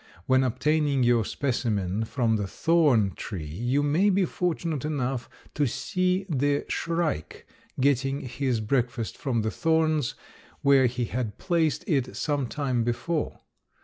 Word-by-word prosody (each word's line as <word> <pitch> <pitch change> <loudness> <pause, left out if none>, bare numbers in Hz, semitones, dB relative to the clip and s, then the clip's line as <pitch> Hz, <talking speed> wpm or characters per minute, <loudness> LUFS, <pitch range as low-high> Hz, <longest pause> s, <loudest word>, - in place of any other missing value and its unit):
When 130 0 +4
obtaining 140 +2 +1
your 120 -2 +4
specimen 110 -6 -1
from 115 -2 +1
the 105 -2 -1
thorn 140 - +3
tree 90 -8 -5
you 120 - -1
may 160 +8 +3
be 195 -1 +3
fortunate 170 -5 -2
enough 135 -5 -2 0.2
to 145 -2 +1
see 185 +8 0
the 145 -3 0
shrike 165 - -2 0.3
getting 135 +1 +1
his 125 -2 -2
breakfast 120 0 -1
from 120 -6 -1
the 110 - -1
thorns 160 -3 +1 0.5
where 135 -2 +5
he 125 0 -2
had 115 -3 -3
placed 170 -4 0
it 135 - 0
some 145 -4 -1
time 130 -3 -1
before. 150 +7 -2
135 Hz, 135 wpm, -26 LUFS, 120-155 Hz, 0.5 s, where